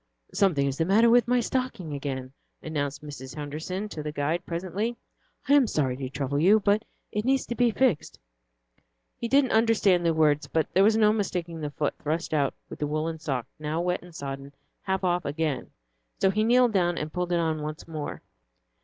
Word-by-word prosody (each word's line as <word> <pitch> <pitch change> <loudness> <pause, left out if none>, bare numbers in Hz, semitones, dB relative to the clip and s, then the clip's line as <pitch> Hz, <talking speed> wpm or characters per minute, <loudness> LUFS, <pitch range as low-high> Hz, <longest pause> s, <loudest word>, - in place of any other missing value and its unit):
"Something 165 -8 +3
is 140 +1 -2
the 165 - +2
matter 220 +6 +5
with 240 -2 +5
my 250 0 +3
stocking 240 - -2
again," 135 -2 -4 0.3
announced 145 -2 -3
Mrs. 135 -3 -8
Henderson 160 +7 -4
to 155 - -6
the 150 0 -4
guide, 155 +4 -1
presently. 190 +7 -2 0.5
"I 280 - +4
am 280 -4 +6
sorry 135 -9 0
to 130 -1 -4
trouble 140 +1 -2
you, 200 +7 +6
but 205 +2 +2 0.3
it 210 - -1
needs 265 +2 +2
to - - -3
be 240 0 +3
fixed." 230 - +1 1.0
He 235 - -4
didn't 270 +1 +3
understand 220 -5 +3
the 170 - +3
words, 150 -2 +3
but 160 -1 +1
there 190 - +5
was 220 +2 +4
no 215 -1 +5
mistaking 175 -6 -3
the 150 - -2
foot 145 0 -1
thrust 160 +2 -2
out 145 -3 +1
with - - -9
the 150 - -1
woollen 155 +2 -2
sock, 135 -7 -2
now 155 +2 -2
wet 180 +1 0
and 175 -2 -14
sodden, 140 -1 -6 0.3
half 190 0 -2
off 175 -1 +1
again. 145 -2 -2 0.5
So 190 - +4
he 215 +2 +1
kneeled 245 0 +4
down 175 -3 +2
and 150 0 -4
pulled 180 0 -2
it 175 - +3
on 160 -2 0
once 155 +1 -6
more. 155 -3 -5
170 Hz, 195 wpm, -27 LUFS, 150-210 Hz, 1.0 s, am